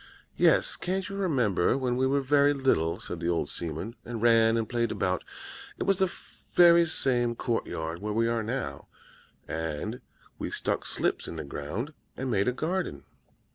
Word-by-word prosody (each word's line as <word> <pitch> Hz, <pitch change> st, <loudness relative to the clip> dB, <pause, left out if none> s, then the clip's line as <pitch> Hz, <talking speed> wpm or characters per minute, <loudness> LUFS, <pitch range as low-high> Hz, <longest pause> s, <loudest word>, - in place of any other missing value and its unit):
"'Yes, -, -, +3 dB
can't 185 Hz, +1 st, -2 dB
you 200 Hz, -, -6 dB
remember 130 Hz, -, +2 dB
when 125 Hz, -2 st, 0 dB
we 130 Hz, +1 st, +2 dB
were 140 Hz, +1 st, +2 dB
very 145 Hz, +1 st, +4 dB
little,' 130 Hz, -, +1 dB
said 85 Hz, -, -5 dB
the 85 Hz, 0 st, -1 dB
old 85 Hz, -1 st, 0 dB
seaman, 85 Hz, +8 st, -5 dB
'and 120 Hz, -1 st, -5 dB
ran 115 Hz, 0 st, +5 dB
and 115 Hz, -1 st, -1 dB
played 120 Hz, -2 st, 0 dB
about? 90 Hz, 0 st, -1 dB, 0.5 s
It -, -, -2 dB
was 195 Hz, -1 st, +2 dB
the 190 Hz, -2 st, +2 dB, 0.4 s
very 170 Hz, -1 st, +7 dB
same 120 Hz, -6 st, +1 dB
court 115 Hz, -1 st, -1 dB
yard 80 Hz, +2 st, -4 dB
where 105 Hz, +1 st, -3 dB
we 115 Hz, +2 st, +2 dB
now 115 Hz, -, +1 dB
are, 110 Hz, -, -3 dB, 0.6 s
and 80 Hz, -, -4 dB, 0.4 s
we -, -, -3 dB
stuck -, -, -2 dB
slips -, -, -1 dB
in -, -, -6 dB
the -, -, -4 dB
ground, 110 Hz, -, -5 dB, 0.2 s
and 130 Hz, -1 st, -2 dB
made 100 Hz, -2 st, +2 dB
a -, -, +4 dB
garden.' 160 Hz, -, -2 dB
120 Hz, 175 wpm, -28 LUFS, 90-140 Hz, 0.6 s, very